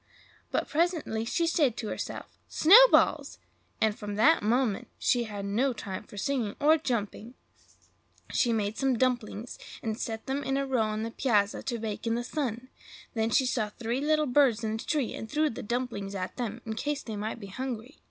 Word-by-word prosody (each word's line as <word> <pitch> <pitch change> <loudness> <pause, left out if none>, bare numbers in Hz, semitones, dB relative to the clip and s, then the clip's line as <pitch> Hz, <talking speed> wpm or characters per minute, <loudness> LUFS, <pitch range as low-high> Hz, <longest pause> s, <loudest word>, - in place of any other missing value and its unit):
But - - -1
presently 310 -9 0
she 335 +8 0
said 295 -8 +2
to 220 - -4
herself, - - -5 0.2
"snowballs!" 475 +10 +6 0.4
and 220 -1 +2
from 205 -1 -6
that 295 +10 +5
moment 225 -1 +1
she 245 -2 +1
had 205 -2 -6
no 240 +7 +1
time 200 -2 -6
for 205 - -13
singing 240 -3 -1
or 310 +2 +5
jumping. 235 -3 -3 0.9
First - - -2
she 240 - +2
made 215 -1 -1
some 270 -3 +2
dumplings, 240 -2 -1 0.2
and 220 -1 -1
set 225 -2 -5
them 275 +2 -2
in 270 +1 0
a 275 - 0
row 260 -3 +1
on 215 0 -1
the 230 - -4
piazza 215 -5 +1
to 240 -3 -3
bake 220 0 -4
in 230 - +1
the 240 - -2
sun; 255 -2 -3 0.4
then 225 -1 0
she 260 +3 +3
saw 230 -4 0
three 235 +4 -3
little 305 +1 +2
birds 250 -4 +3
in 220 - -1
a 220 - -2
tree, 285 -1 -1
and 220 - -7
threw 305 +4 +1
the - - -7
dumplings 230 -4 -3
at 185 -1 -4
them, 235 -2 -4
in 220 - -3
case 290 +6 -2
they 220 - -6
might 215 +3 -4
be 205 - -8
hungry. 250 +5 -6
235 Hz, 195 wpm, -29 LUFS, 215-270 Hz, 0.9 s, snowballs